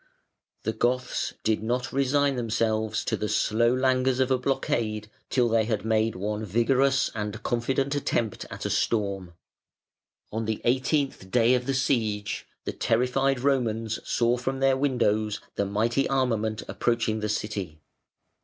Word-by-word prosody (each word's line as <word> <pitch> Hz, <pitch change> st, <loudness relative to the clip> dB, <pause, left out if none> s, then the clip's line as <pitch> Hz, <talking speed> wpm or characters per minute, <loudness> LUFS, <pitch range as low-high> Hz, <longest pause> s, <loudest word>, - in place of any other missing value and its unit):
The 110 Hz, -, -1 dB
Goths 125 Hz, +2 st, -1 dB
did 110 Hz, -1 st, +1 dB
not 120 Hz, +3 st, -2 dB
resign 140 Hz, +1 st, +2 dB
themselves 110 Hz, -2 st, 0 dB
to -, -, 0 dB
the 105 Hz, -, -3 dB
slow 115 Hz, +2 st, +2 dB
languors 130 Hz, 0 st, +2 dB
of 130 Hz, 0 st, +2 dB
a 130 Hz, -, +3 dB
blockade 115 Hz, -5 st, -1 dB, 0.2 s
till 125 Hz, -2 st, +2 dB
they 115 Hz, -1 st, +2 dB
had 110 Hz, -2 st, -2 dB
made 110 Hz, 0 st, +1 dB
one 105 Hz, +3 st, -3 dB
vigorous 130 Hz, +6 st, +2 dB
and 105 Hz, 0 st, -4 dB
confident 135 Hz, +4 st, 0 dB
attempt 120 Hz, -6 st, -1 dB
at -, -, -7 dB
a -, -, -1 dB
storm. 100 Hz, -5 st, -1 dB, 1.0 s
On 110 Hz, +1 st, -2 dB
the 110 Hz, -1 st, -2 dB
eighteenth 130 Hz, -4 st, 0 dB
day 120 Hz, +3 st, +4 dB
of 125 Hz, 0 st, 0 dB
the 135 Hz, -, +1 dB
siege 110 Hz, -6 st, -1 dB, 0.2 s
the -, -, -3 dB
terrified 125 Hz, +3 st, +1 dB
Romans 115 Hz, -5 st, 0 dB
saw 120 Hz, +1 st, +1 dB
from 135 Hz, +2 st, -3 dB
their 135 Hz, 0 st, +4 dB
windows 115 Hz, -6 st, +1 dB
the 100 Hz, -, -1 dB
mighty 115 Hz, +7 st, +1 dB
armament 115 Hz, -5 st, 0 dB
approaching 115 Hz, -2 st, 0 dB
the 105 Hz, 0 st, -2 dB
City. 100 Hz, -6 st, -3 dB
115 Hz, 145 wpm, -26 LUFS, 110-130 Hz, 1.0 s, day